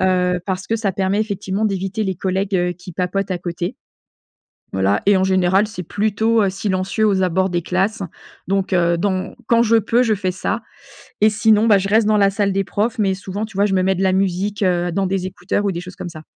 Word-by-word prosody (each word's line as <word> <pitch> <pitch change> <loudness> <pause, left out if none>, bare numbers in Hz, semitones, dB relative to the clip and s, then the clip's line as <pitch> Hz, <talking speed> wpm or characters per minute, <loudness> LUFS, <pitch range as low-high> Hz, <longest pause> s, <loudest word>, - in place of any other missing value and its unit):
heu, 180 -1 +1
parce 185 -1 -3
que 225 - 0
ça 205 -4 -1
permet 195 +2 0
effectivement 200 -1 -2
d'éviter 195 +2 -2
les 190 -2 -1
collègues, 190 +2 -1
heu, 180 0 0
qui 180 0 -12
papotent 185 +3 -2
à 180 - -2
côté. 175 0 -4 1.0
Voilà 95 +2 +1
et 200 -1 +5
en 190 - +2
général, 190 +2 +2
c'est 185 -4 -7
plutôt, 220 +4 +1
heu, 195 - +2
silencieux 195 +2 -1
aux 190 -2 +2
abords 185 +2 +1
des 175 -1 -1
classes, 195 +5 -1 0.5
donc, 195 0 0
heu, 170 -1 +2
dans 185 +1 -2
quand 235 0 +4
je 230 0 +3
peux, 230 +2 +3
je 225 -3 +2
fais 190 -3 -1
ça 205 +4 -3 0.6
et 215 - +6
sinon, 215 +1 +3
bah, 205 -3 +6
je 195 - -2
reste 215 +1 +3
dans 215 -1 +3
la 200 -1 +4
salle 200 0 0
des 195 0 0
profs, 220 +4 -2
mais 195 -2 +2
souvent, 195 +3 -5
tu 215 -3 -13
vois, 200 - +3
je 200 - -2
me 185 - +2
mets 190 +1 +2
de 190 - -2
la 190 -1 +3
musique, 195 +2 -1
heu, 175 -2 +1
dans 195 +1 0
des 190 -1 -1
écouteurs 190 +2 -2
ou 200 - +1
des 170 - -4
choses 180 +1 -10
comme 175 - -6
ça. 155 -2 -11
195 Hz, 235 wpm, -19 LUFS, 185-205 Hz, 1.0 s, et